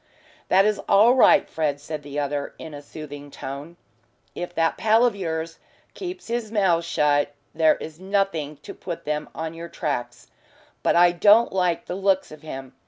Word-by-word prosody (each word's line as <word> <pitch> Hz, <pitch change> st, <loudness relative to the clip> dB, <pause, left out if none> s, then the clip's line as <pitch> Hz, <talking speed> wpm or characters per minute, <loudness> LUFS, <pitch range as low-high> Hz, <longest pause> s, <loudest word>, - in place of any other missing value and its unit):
"That 195 Hz, +2 st, +5 dB
is 210 Hz, 0 st, +1 dB
all 220 Hz, +5 st, +6 dB
right, 210 Hz, -6 st, +5 dB
Fred," 150 Hz, -3 st, -1 dB
said 150 Hz, +1 st, -6 dB
the 145 Hz, 0 st, -8 dB
other, 145 Hz, 0 st, -2 dB
in 160 Hz, -, -9 dB
a 145 Hz, -, -8 dB
soothing 145 Hz, -1 st, -9 dB
tone. 145 Hz, +5 st, -8 dB, 0.6 s
"If 175 Hz, 0 st, -5 dB
that 165 Hz, 0 st, +2 dB
pal 225 Hz, +2 st, +4 dB
of 235 Hz, -4 st, +1 dB
yours 165 Hz, -3 st, -4 dB, 0.3 s
keeps 365 Hz, -1 st, -7 dB
his 230 Hz, -2 st, -3 dB
mouth 190 Hz, -6 st, +2 dB
shut 145 Hz, -3 st, +1 dB, 0.2 s
there 160 Hz, -1 st, +4 dB
is 155 Hz, +1 st, -9 dB
nothing 190 Hz, -6 st, -1 dB
to -, -, -8 dB
put 170 Hz, -3 st, -7 dB
them 150 Hz, 0 st, -2 dB
on 160 Hz, 0 st, -4 dB
your 170 Hz, +1 st, -8 dB
tracks. 130 Hz, -8 st, -4 dB, 0.5 s
But -, -, +2 dB
I 175 Hz, 0 st, +6 dB
don't 205 Hz, +6 st, +5 dB
like 180 Hz, -3 st, 0 dB
the -, -, -5 dB
looks 195 Hz, 0 st, +1 dB
of 155 Hz, -1 st, -11 dB
him. 135 Hz, -4 st, -8 dB
165 Hz, 175 wpm, -24 LUFS, 150-195 Hz, 0.6 s, all